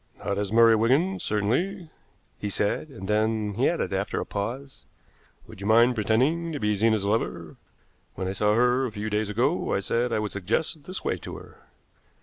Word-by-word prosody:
"Not 100 Hz, 0 st, -1 dB
as 100 Hz, -1 st, -2 dB
Murray 115 Hz, 0 st, +6 dB
Wigan, 140 Hz, -, +2 dB
certainly," 145 Hz, -, -1 dB, 0.5 s
he 105 Hz, -, -3 dB
said, 105 Hz, +8 st, -1 dB
and 110 Hz, -8 st, -9 dB
then 105 Hz, 0 st, 0 dB
he 120 Hz, +7 st, +2 dB
added, 170 Hz, -, -2 dB
after 100 Hz, +1 st, -1 dB
a -, -, -3 dB
pause: 125 Hz, +7 st, -5 dB, 0.6 s
"Would 95 Hz, -, -13 dB
you 100 Hz, -, -3 dB
mind 115 Hz, +3 st, +5 dB
pretending 130 Hz, +10 st, +1 dB
to 145 Hz, -, -3 dB
be 105 Hz, -2 st, +1 dB
Zena's 110 Hz, 0 st, +2 dB
lover? 85 Hz, -6 st, -2 dB, 0.6 s
When 95 Hz, +1 st, -3 dB
I -, -, -1 dB
saw 105 Hz, +2 st, +2 dB
her 125 Hz, +2 st, +3 dB
a -, -, -7 dB
few 105 Hz, 0 st, -5 dB
days 105 Hz, 0 st, 0 dB
ago 125 Hz, -, 0 dB
I -, -, +1 dB
said 120 Hz, +5 st, -1 dB
I -, -, +1 dB
would 105 Hz, -1 st, -2 dB
suggest 115 Hz, -, -2 dB
this 185 Hz, +1 st, -6 dB
way -, -, 0 dB
to -, -, -8 dB
her." -, -, -15 dB
110 Hz, 190 wpm, -26 LUFS, 105-130 Hz, 0.6 s, Murray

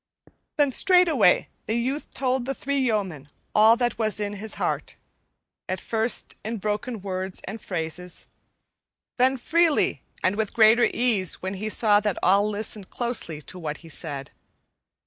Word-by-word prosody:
Then 290 Hz, -2 st, +3 dB
straightway 330 Hz, -, +4 dB, 0.2 s
the 220 Hz, -, 0 dB
youth 260 Hz, +5 st, -2 dB
told 260 Hz, -2 st, -1 dB
the 270 Hz, +1 st, -3 dB
three 280 Hz, +1 st, -1 dB
yeomen 195 Hz, -, -1 dB, 0.2 s
all 220 Hz, +2 st, +6 dB
that 240 Hz, -1 st, -1 dB
was 215 Hz, -2 st, 0 dB
in 205 Hz, -1 st, -2 dB
his 205 Hz, +1 st, -4 dB
heart; -, -, -2 dB, 0.7 s
at 185 Hz, 0 st, -2 dB
first 225 Hz, +2 st, -1 dB
in 225 Hz, +2 st, -3 dB
broken 210 Hz, +1 st, -3 dB
words 190 Hz, -1 st, -4 dB
and 215 Hz, +3 st, -7 dB
phrases, 175 Hz, 0 st, -4 dB, 0.9 s
then 260 Hz, +2 st, +4 dB
freely 325 Hz, +4 st, +2 dB, 0.2 s
and 185 Hz, +2 st, +2 dB
with 220 Hz, -2 st, -2 dB
greater 225 Hz, +1 st, +6 dB
ease 215 Hz, -9 st, 0 dB
when 190 Hz, +1 st, -2 dB
he 210 Hz, +3 st, -4 dB
saw 210 Hz, -1 st, +4 dB
that 210 Hz, -3 st, -1 dB
all 200 Hz, +3 st, +4 dB
listened 210 Hz, -1 st, -3 dB
closely 225 Hz, -11 st, -3 dB
to 180 Hz, -, -8 dB
what 155 Hz, -3 st, -4 dB
he -, -, -11 dB
said. 145 Hz, -3 st, -5 dB
215 Hz, 150 wpm, -25 LUFS, 185-245 Hz, 0.9 s, all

